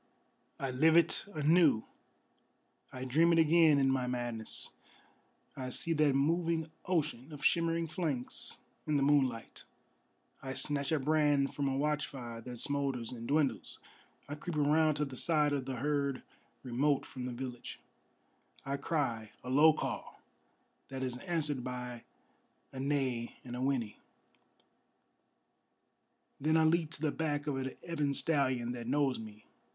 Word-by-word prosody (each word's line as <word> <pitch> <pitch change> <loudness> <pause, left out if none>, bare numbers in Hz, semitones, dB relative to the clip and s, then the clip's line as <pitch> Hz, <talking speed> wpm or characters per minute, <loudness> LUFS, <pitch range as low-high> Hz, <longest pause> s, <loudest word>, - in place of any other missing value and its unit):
I 135 -1 -2
live 160 +6 +4
it 170 -1 +3
anew, 155 -6 +4 1.1
I 130 0 -6
dream 160 +7 +4
it - - +3
again 160 -1 +5
in 135 -1 +3
my 130 -1 0
madness. 120 -3 -2 0.8
I 130 -1 -5
see 165 +6 0
that 150 -3 +3
moving 165 +2 +1 0.2
ocean 155 -6 -1
of 150 0 -7
shimmering 165 0 +2
flanks 155 -6 -2 0.3
in 150 - +1
the 140 - +3
moonlight: 135 -5 +1 0.8
I 130 -1 -5
snatch 140 -1 -1
a 160 - +3
brand 145 -1 +2
from 140 -1 -1
a 135 0 0
watchfire 135 -5 -2
that 125 +1 -8
smoulders 135 -3 -1
and 115 -2 -7
dwindles: 145 -1 0 0.5
I 145 - -5
creep 155 +3 -5
around 155 +1 +3
to 150 0 0
the 135 -2 -8
side 150 +1 +2
of 135 -2 -1
the 135 -1 -4
herd 140 0 -1 0.4
remote 135 +3 +1
from 125 -2 -7
the - - -4
village: 125 0 -7 0.9
I 140 +1 -2
cry, 130 -8 -2
a 125 - -5
low 150 +4 +7
call, 155 - -5 0.7
that 135 -1 -5
is 125 -1 -2
answered 150 -7 -2
by 125 -1 -6 0.7
a 130 - -6
neigh 130 -4 -1
and 125 -1 -7
a 125 - -4
whinny: 130 -5 -1 2.4
Then 155 +3 +2
I 160 - +4
leap 160 0 +2
to - - -5
the 155 - +2
back 145 -2 -2
of 145 -2 -1
an 130 0 -4
ebon 150 -4 -1
stallion 130 -7 +1
that 120 -1 -6
knows 135 -1 +1
me. 110 -1 -11
140 Hz, 145 wpm, -33 LUFS, 125-155 Hz, 2.4 s, low